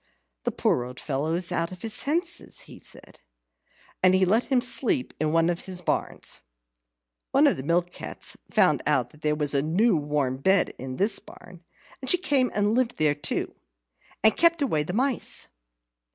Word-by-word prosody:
"The - - 0
poor 120 - +1
old 125 +1 -9
fellow 150 +3 -2
is 180 +1 -1
out 170 0 -1
of 185 -1 -10
his 225 -1 -2
senses," 340 +4 0
he - - -13
said. - - -10 0.8
And 185 0 +5
he 190 0 +4
let 220 +6 +2
him 265 -3 +2
sleep 240 - +1
in 155 0 0
one 165 0 +3
of 175 -1 -2
his 185 -2 -4
barns. - - -3 0.9
One - - +4
of - - +4
the - - -6
mill 170 +5 +1
cats 175 - -7
found - - +3
out - - +1
that 150 - -20
there 150 -1 +1
was 150 -1 +2
a 140 - +2
new 180 +8 +2
warm 145 -4 -1
bed 190 +8 +2
in 130 0 -6
this 200 - +2
barn, 180 -1 -15 0.4
and 260 - -5
she 360 - +6
came 280 -8 +1
and 205 +1 +2
lived 245 0 0
there 155 -2 +3
too, 145 - -3 0.7
and 220 -1 +7
kept 335 -2 +3
away 155 - +1
the 155 +4 -4
mice. 255 +3 -1
180 Hz, 185 wpm, -26 LUFS, 150-230 Hz, 0.9 s, and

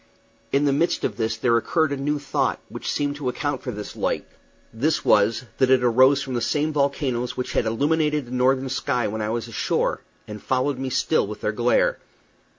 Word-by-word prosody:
In 140 +1 +2
the 140 - +3
midst 165 +5 +1
of - - -2
this 110 -1 -1
there 115 +1 +2
occurred 160 +6 +1
a - - 0
new 145 +2 -1
thought, 145 -1 -1
which - - -6
seemed 145 0 -1
to 140 -3 -2
account 140 +1 -2
for - - -6
this 105 -3 -6
light - - -1 0.5
this 150 +8 0
was, 110 +4 +3
that 130 -1 +4
it 130 -1 +4
arose 130 +4 +5
from 130 - -5
these 120 -2 -1
same 155 +1 0
volcanoes 135 -4 -1
which 125 - -3
had 115 - +1
illuminated 150 +4 +1
the 120 - -13
northern 130 +1 +1
sky 130 -1 -1
when 110 +1 -4
I 105 - -2
was 115 +1 -2
ashore, 115 - -1 0.3
and 105 -1 -8
followed 130 +1 0
me 135 0 -3
still - - +1
with - - -8
their - - 0
glare. - - +2
130 Hz, 205 wpm, -23 LUFS, 120-145 Hz, 0.5 s, arose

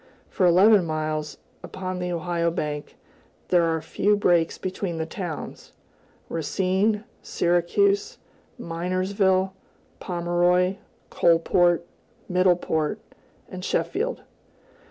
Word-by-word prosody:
For 185 - +2
eleven 195 +3 +6
miles, 155 -2 -3 0.2
upon 185 -1 -5
the 180 0 -3
Ohio 170 0 -1
bank, 150 -3 -4 0.5
there 175 -2 +4
are 165 -1 0
few 205 +5 +1
breaks 175 -4 +2
between 185 -2 -4
the 160 - -2
towns, 170 -2 -7 0.5
Racine, 190 +6 0 0.2
Syracuse, 400 - +1 0.4
Minersville, 185 +2 0 0.5
Pomeroy, 175 +1 +1 0.3
Coalport, 170 +1 +3 0.4
Middleport, 180 -4 +1 0.5
and - - -8
Sheffield. - - -2
175 Hz, 90 wpm, -24 LUFS, 165-190 Hz, 0.5 s, eleven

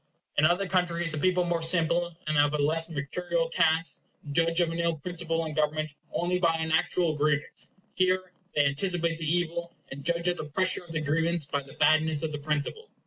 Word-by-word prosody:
In 150 - +4
other 175 +4 +3
countries, 175 -2 0
the 155 - -3
people, 180 +2 +2
more 170 -1 -1
simple, 170 0 +1
and 155 0 -1
of 145 0 +3
a - - +1
less 160 +3 +2
mercurial 165 +3 -2
cast, 165 +1 +1 0.3
judge 165 +3 +2
of 170 -2 +2
an 165 - -4
ill 170 -1 +1
principle 165 +1 -3
in 155 - -5
government 155 0 0 0.2
only 180 +1 0
by 165 -2 +3
an 160 0 -2
actual 160 0 +1
grievance; 145 -1 -1 0.2
here 185 0 +1 0.2
they 145 - +4
anticipate 165 +3 +1
the 155 -1 0
evil, 170 0 -1 0.2
and 140 +1 -7
judge 170 +2 +1
of 175 0 +1
the - - -4
pressure 185 +5 +1
of 170 - -12
the 160 -1 -2
grievance 165 +2 0
by 140 0 -2
the 135 -1 -14
badness 155 -1 +3
of 160 - -1
the 150 - -4
principle. 150 - -3
165 Hz, 200 wpm, -28 LUFS, 155-175 Hz, 0.3 s, In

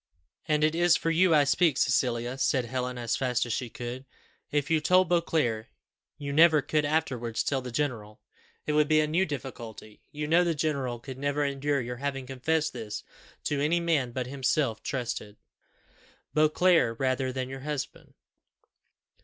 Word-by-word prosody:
"And 150 0 +2
it 155 0 +3
is 175 0 +4
for 165 - -1
you 170 0 +4
I 145 - +6
speak, 145 0 +2
Cecilia," 120 -1 +1
said 130 -2 +1
Helen, 125 +1 -3
as 120 -1 -1
fast 125 -2 0
as 120 - -2
she 125 0 -3
could. 120 +3 -6 0.5
"If 145 +1 -1
you 160 -1 +3
told 185 +2 +4
Beauclerc, 155 -10 +1 0.5
you 140 -1 -5
never 155 -1 +6
could 150 -1 0
afterwards 130 -7 -1
tell 135 -2 0
the 125 -1 -7
general; 115 -6 -3 0.5
it 150 - -1
would 150 0 +3
be 155 0 +4
a 155 - +3
new 170 +5 +1
difficulty. 120 -6 -8
You 150 0 -4
know 165 +4 +4
the 170 -2 0
general 140 -5 -1
could 130 +2 -9
never 145 +1 0
endure 140 0 0
your 120 0 -5
having 135 0 -3
confessed 150 +5 -1
this 110 -4 -6 0.4
to 145 -1 -1
any 160 +4 +2
man 155 -7 0
but 125 +1 -3
himself 130 -3 0
trusted 120 -5 -4 1.0
Beauclerc 155 -4 +3
rather 130 0 0
than 130 0 -3
your 135 +1 -7
husband." 145 0 -6
140 Hz, 170 wpm, -28 LUFS, 125-155 Hz, 1.0 s, I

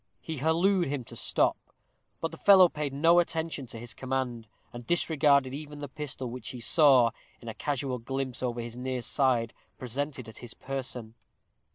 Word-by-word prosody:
He 160 -1 -6
hallooed 170 +6 +2
to - - -4
him 140 -3 -3
to - - -10
stop; - - +1 0.6
but 165 - -2
the - - -9
fellow 190 -3 +7
paid 150 -3 -3
no 165 +5 +4
attention 160 -5 -2
to 115 - -8
his 120 +1 -6
command, 130 -3 -3 0.3
and 120 0 -8
disregarded 145 -4 +2
even 150 +1 -7
the 145 0 -6
pistol 135 -2 -6
which 120 -1 -6
he 125 - -7
saw, 130 -2 +5 0.3
in 120 - -13
a 115 - -4
casual 135 0 -2
glimpse 135 +1 -4
over 120 -2 -2
his 115 0 -7
near 125 0 -3
side, 125 -5 +1 0.2
presented 130 0 -4
at 110 - -11
his 120 -2 -9
person. 130 -4 -5
135 Hz, 180 wpm, -29 LUFS, 120-150 Hz, 0.6 s, fellow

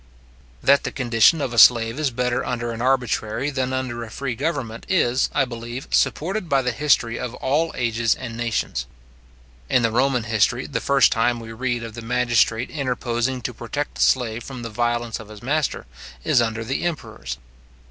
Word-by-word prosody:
That 140 0 +5
the - - -3
condition 125 +4 +3
of 130 -4 -2
a 115 - +3
slave 115 +3 +6
is 150 -3 +1
better 125 0 -1
under 120 -1 -3
an 115 0 -5
arbitrary 125 0 0
than 130 -2 -1
under 130 -2 -3
a 115 - -8
free 125 +2 -3
government, 130 -4 -3
is, 130 -9 +2
I 140 - +2
believe, 120 +1 -7
supported 185 +2 0
by 135 -2 +3
the 125 - 0
history 125 -4 +1
of 125 -1 -4
all 155 +5 0
ages 115 -2 +1
and 115 -3 -7
nations. 115 -1 -2 0.8
In 125 - +3
the 115 - +2
Roman 125 0 +2
history, 115 +3 +1
the 140 - -3
first 140 -1 +4
time 120 -1 +1
we 115 0 -8
read 120 0 -2
of 115 -1 -7
the 115 - -7
magistrate 120 0 +1
interposing 125 -3 -2
to 125 - -3
protect 130 +6 -4
the - - -6
slave 120 -3 +2
from 130 -3 -8
the 115 - -5
violence 120 +1 -1
of 110 -2 -11
his 105 0 -12
master, 145 - -1 0.4
is 120 - +3
under 115 -1 -1
the 130 +4 -2
emperors. 110 - -4
120 Hz, 185 wpm, -22 LUFS, 115-135 Hz, 0.8 s, slave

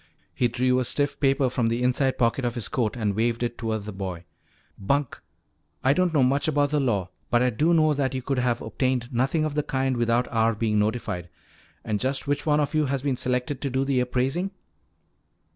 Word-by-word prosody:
He 125 - +2
drew 125 +2 +1
a - - +1
stiff 145 +4 -1
paper 135 -1 +3
from 125 -2 0
the 115 +2 0
inside 130 +1 +1
pocket 120 +2 +1
of 120 -1 -1
his 120 - -4
coat 120 -2 -1
and 105 -4 -1
waved 115 +2 0
it 120 0 -2
toward 110 -3 -3
the 105 - -5
boy. 95 -3 -5 0.5
"Bunk! 140 +6 -1 0.6
I 130 - +4
don't 180 +2 +2
know 145 -4 +3
much 140 +4 +2
about 145 -2 +2
the 150 - +2
law 100 -9 0 0.2
but 120 0 +3
I 125 - +2
do 150 +9 +2
know 155 -2 +4
that 135 -2 -1
you 130 - -3
could 135 0 -1
have 125 -1 0
obtained 125 +1 -1
nothing 135 +6 +1
of 155 - -2
the 150 - +1
kind 130 -2 -1
without 120 +1 +1
our 115 -1 +2
being 105 -1 +1
notified. 105 -5 -2 0.6
And 105 -1 -1
just 135 +3 -1
which 145 +2 -1
one 150 0 +3
of 145 0 0
you 155 -1 +2
has 135 0 -2
been 140 -3 +1
selected 125 +2 -2
to 140 - -1
do 130 +1 0
the 135 -2 +1
appraising?" 130 +9 0
125 Hz, 215 wpm, -25 LUFS, 115-140 Hz, 0.6 s, I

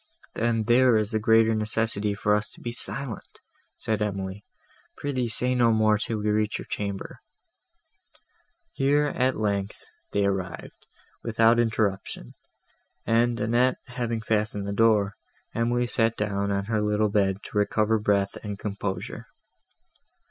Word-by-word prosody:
"Then 115 -1 0
there 120 +1 +5
is 110 0 -1
the 110 - 0
greater 110 +1 +4
necessity 110 -1 0
for 105 0 +1
us 105 0 -1
to - - -14
be 120 - -4
silent," 125 0 -4 0.4
said 110 -1 -2
Emily: 100 -1 -3 0.5
"pr'ythee 130 -4 -2
say 125 +2 0
no 120 -2 +4
more, 110 -1 +3
till 110 +1 -2
we 105 0 0
reach 105 0 0
your - - -8
chamber." 100 -1 -5 1.5
Here, 145 +2 +2
at 130 0 +1
length, 100 -1 -2 0.3
they 100 0 +1
arrived, 95 -2 -4 0.3
without 115 +1 +3
interruption, 105 - -1 0.7
and, 115 +1 +2
Annette 120 +4 +2
having 120 -2 -3
fastened 105 -2 -1
the 100 - -2
door, 105 -2 +3 0.4
Emily 120 +1 +1
sat 115 -1 +1
down 100 -1 -1
on 100 0 -1
her 110 0 0
little 105 0 +1
bed, 100 -1 +1
to - - -6
recover 110 +1 +2
breath 100 -1 +1
and 105 -2 -5
composure. 100 -3 -5
110 Hz, 140 wpm, -26 LUFS, 100-115 Hz, 1.5 s, there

